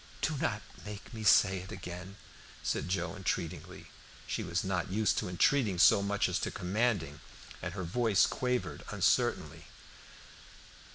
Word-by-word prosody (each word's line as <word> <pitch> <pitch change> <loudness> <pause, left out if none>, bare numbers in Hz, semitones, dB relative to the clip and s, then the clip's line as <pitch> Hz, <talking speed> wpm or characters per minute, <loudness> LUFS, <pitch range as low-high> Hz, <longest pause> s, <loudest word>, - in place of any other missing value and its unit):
"Do 160 - +1
not 120 -8 -1 0.2
make 105 +3 -9
me 110 -1 -6
say 95 -2 +5
it 95 +1 -9
again," 90 +1 -7 0.5
said - - -1
Joe, 90 -2 -1
entreatingly. 90 -4 -4 0.4
She - - -3
was 85 +1 -1
not 95 -2 -1
used 105 +3 +1
to - - -4
entreating 100 +2 +2
so 100 - +6
much 100 +1 +1
as - - -1
to - - -2
commanding, 95 -6 -1 0.4
and 90 +1 -5
her 95 - -3
voice 105 +3 +3
quavered 125 -1 -2
uncertainly. - - +1
95 Hz, 140 wpm, -32 LUFS, 90-110 Hz, 0.5 s, so